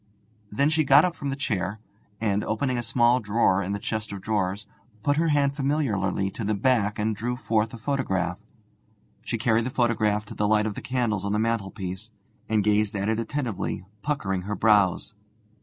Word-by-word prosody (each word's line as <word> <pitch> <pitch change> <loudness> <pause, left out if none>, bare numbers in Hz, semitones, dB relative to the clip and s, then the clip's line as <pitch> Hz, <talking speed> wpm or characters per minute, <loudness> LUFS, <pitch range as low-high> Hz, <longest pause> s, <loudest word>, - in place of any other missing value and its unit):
Then 140 +8 +2
she 160 0 +3
got 140 +3 +6
up 175 -2 -2
from 140 - -4
the 135 - -1
chair, 105 -6 -2 0.4
and, 105 -2 0
opening 130 +4 -1
a - - -1
small 120 +1 +3
drawer 105 -3 +2
in 95 0 -3
the - - -1
chest 110 +1 -4
of 100 - -5
drawers, 100 0 -1 0.4
put 145 0 +2
her 165 +1 +2
hand 140 -2 +2
familiarly 110 -10 0
to 115 - -6
the 105 +1 0
back 105 -1 +1
and 110 +1 0
drew 120 +4 -2
forth 110 -1 0
a - - -8
photograph. 100 -9 -1 0.8
She 115 - -3
carried 115 +1 +2
the - - -1
photograph 110 -4 +1
to 110 - -9
the 105 -1 0
light 105 0 +3
of 110 - -2
the - - -7
candles 120 -6 -1
on 100 0 -1
the - - +1
mantelpiece, 105 -2 -2 0.4
and 110 -2 +2
gazed 105 0 +2
at 100 +1 -1
it 110 0 0
attentively, 115 -7 -3 0.2
puckering 100 -11 -1
her 105 +1 -2
brows. 105 -1 +3
110 Hz, 190 wpm, -26 LUFS, 100-125 Hz, 0.8 s, got